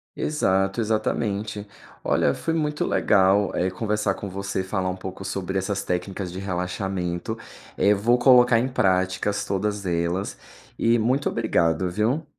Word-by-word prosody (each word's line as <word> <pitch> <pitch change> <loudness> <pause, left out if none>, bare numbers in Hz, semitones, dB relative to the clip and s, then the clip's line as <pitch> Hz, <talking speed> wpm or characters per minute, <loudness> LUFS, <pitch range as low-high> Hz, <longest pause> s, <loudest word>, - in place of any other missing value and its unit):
Exato, 95 -8 0
exatamente. 110 -1 -1 0.4
Olha, - - +2
foi 165 - -2
muito 150 -2 -1
legal, 100 0 +3
eh, 90 - +1
conversar 105 0 -1
com 100 - -6
você, 100 0 -3
falar 95 -1 -2
um 90 - -3
pouco 95 +1 -7
sobre 95 0 -3
essas 100 +1 -2
técnicas 90 +1 -3
de 90 - -6
relaxamento. 90 +1 -3 0.4
Eh, 100 - +4
vou 115 +5 +2
colocar 125 -2 +6
em 125 - 0
práticas 95 -3 0
todas 100 +1 -2
elas 85 +2 -1 0.4
e 115 +1 +3
muito 130 +5 +1
obrigado, 90 -5 +1
viu. 115 - 0
100 Hz, 140 wpm, -24 LUFS, 95-110 Hz, 0.4 s, colocar